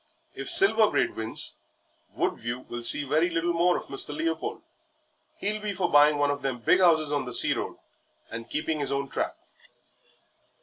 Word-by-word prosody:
If - - -7
Silver 225 - +7
Braid - - -2
wins, 110 0 -2 0.6
Woodview 120 +2 -4
will 120 -1 -9
see 120 +5 +4
very 155 +5 0
little 170 +1 -2
more 175 +1 +1
of - - -7
Mr. 395 -1 +1
Leopold. 330 +1 -4 0.7
He'll 210 +1 -3
be 210 -1 -4
for 185 -2 -3
buying 145 +1 +4
one 145 0 0
of 145 - -5
them 135 -2 -4
big 120 +10 +1
houses 160 -5 +2
on 145 -2 -2
the 125 - -6
sea - - +3
road - - -6 0.5
and 115 0 -8
keeping 155 0 -3
his 140 - -3
own 140 0 -3
trap." - - -4
150 Hz, 175 wpm, -25 LUFS, 135-180 Hz, 0.7 s, Silver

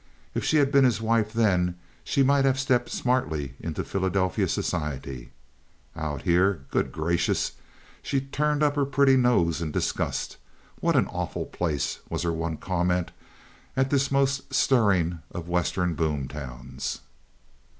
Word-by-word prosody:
If - - -2
she 155 - +2
had 140 -2 +3
been 140 -1 +5
his 125 -4 +3
wife 110 -1 +1
then 90 -6 +2 0.3
she 140 - +2
might 140 +1 +4
have 135 -1 +2
stepped 125 -2 +1
smartly 80 - -1
into 80 -2 -4
Philadelphia 95 -1 0
society. 70 -6 -3 0.6
Out 75 -4 -4
here, 90 -3 +2
good - - 0
gracious! 85 +2 0 0.5
She 135 - 0
turned 150 +2 0
up 145 -1 +2
her 145 -1 +2
pretty 135 0 +4
nose 110 -11 +3
in 80 - -2
disgust. - - -2 0.4
"What - - +1
an - - +4
awful - - -4
place!" 80 -5 -2
was - - -2
her 85 -1 0
one 80 -1 -3
comment 90 0 0 0.7
at 135 0 +2
this 140 -1 +2
most 135 0 +1
stirring 100 -11 +3
of 85 -1 -6
Western 90 0 0
boom 75 -4 -1
towns. 65 -2 -6
90 Hz, 145 wpm, -26 LUFS, 80-130 Hz, 0.7 s, been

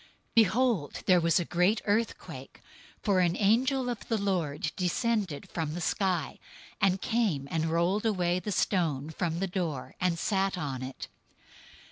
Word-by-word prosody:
028:002 - - -24 0.3
Behold, 225 - +2
there 180 -1 +5
was 165 0 +3
a 175 - -2
great 180 +6 +2
earthquake, 220 +2 -2 0.4
for 200 -4 +3
an 175 -1 +2
angel 250 +5 +2
of 245 - -4
the 225 - +1
Lord 170 -7 -1
descended 190 - -1
from 160 -2 -3
the - - -3
sky, 175 -3 -1 0.4
and 195 -1 +3
came 205 - 0
and 160 -1 0
rolled 175 +7 +1
away 180 -4 +1
the 210 - -4
stone 160 -7 0
from 165 0 -2
the 195 - 0
door, 175 -8 -3
and 180 -2 +1
sat 195 +1 0
on 140 -6 -3
it. 130 0 -6
180 Hz, 155 wpm, -29 LUFS, 165-210 Hz, 0.4 s, there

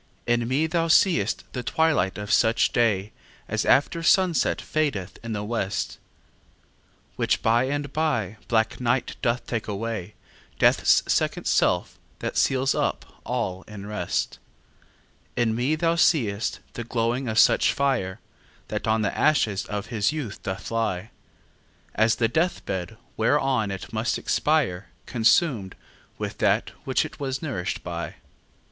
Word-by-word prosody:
In 120 -1 +1
me 135 +5 +1
thou 165 +1 0
see'st 160 - +3
the 125 - -3
twilight 145 - +1
of 105 0 -2
such 115 0 +3
day 110 -4 +1 0.4
As - - -1
after 160 +4 +3
sunset 175 0 +3
fadeth 130 -12 -2
in 115 -1 -4
the 105 -1 -3
west; 105 -2 -2 1.2
Which - - +1
by 115 +3 +3
and 145 +1 -3
by 120 - 0
black 110 -1 +1
night 125 +1 0
doth 120 +1 0
take 115 -3 -3
away, 105 -1 -4 0.4
Death's - - +4
second - - 0
self, - - +1 0.2
that - - -4
seals 135 0 +2
up - - -3
all 95 0 -2
in 100 -2 -9
rest. 105 +1 -2 1.0
In 120 -2 +1
me 125 +7 +1
thou 165 +1 +1
see'st 115 - +1
the 120 - -5
glowing 120 +2 -1
of 110 -1 -2
such - - +5
fire, 130 -10 0 0.5
That 105 +1 -3
on 110 0 +2
the 100 - -1
ashes 110 -10 +2
of 105 -1 -3
his 105 +3 +2
youth 145 -10 -5
doth 95 0 -5
lie, 110 -3 -1 0.8
As 110 +1 +3
the 115 - +2
death 165 +8 0
bed, 95 +2 -4 0.2
whereon 130 -2 +2
it 95 +1 -7
must 110 +2 0
expire, 125 - 0 0.2
Consum'd 115 - +2 0.4
with - - -5
that - - +2
which - - +1
it - - -10
was 135 0 -3
nourish'd 120 - -3
by. 85 -1 -5
115 Hz, 140 wpm, -25 LUFS, 105-140 Hz, 1.2 s, such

